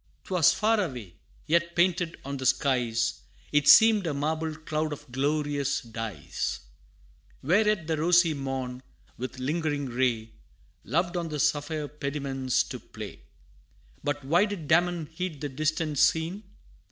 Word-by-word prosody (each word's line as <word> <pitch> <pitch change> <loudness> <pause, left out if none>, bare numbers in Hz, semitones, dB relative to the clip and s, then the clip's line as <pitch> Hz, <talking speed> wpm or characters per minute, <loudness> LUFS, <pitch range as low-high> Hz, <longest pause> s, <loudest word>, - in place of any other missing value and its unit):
'Twas 180 -5 +4
far 215 -1 +2
away, 120 - -6 0.3
yet 170 +1 +1
painted 175 -1 +1
on 140 0 -4
the 130 - -5
skies, 120 -4 +1 0.3
It 150 -1 +2
seemed 220 -4 +7
a 150 - -1
marble 155 +2 -1
cloud 155 -1 -2
of 145 +1 -10
glorious 145 +1 0
dyes, 115 -8 -4 0.8
Where 195 +10 +3
yet 210 -6 +1
the 160 0 -1
rosy 170 +1 +4
morn, 135 -3 -4 0.4
with 130 +1 -5
lingering 145 +1 -1
ray, 120 -3 -1 0.5
Loved 170 - 0
on 170 -1 -2
the 150 -1 -4
sapphire 150 +1 0
pediments 140 -3 -1
to - - -7
play. - - -10 0.8
But 145 -1 -2
why 170 +8 +4
did 200 -8 -5
Damon 175 0 +2
heed 160 0 -5
the 145 0 -4
distant 155 +1 -1
scene? 170 +6 +2
150 Hz, 140 wpm, -27 LUFS, 135-170 Hz, 0.8 s, seemed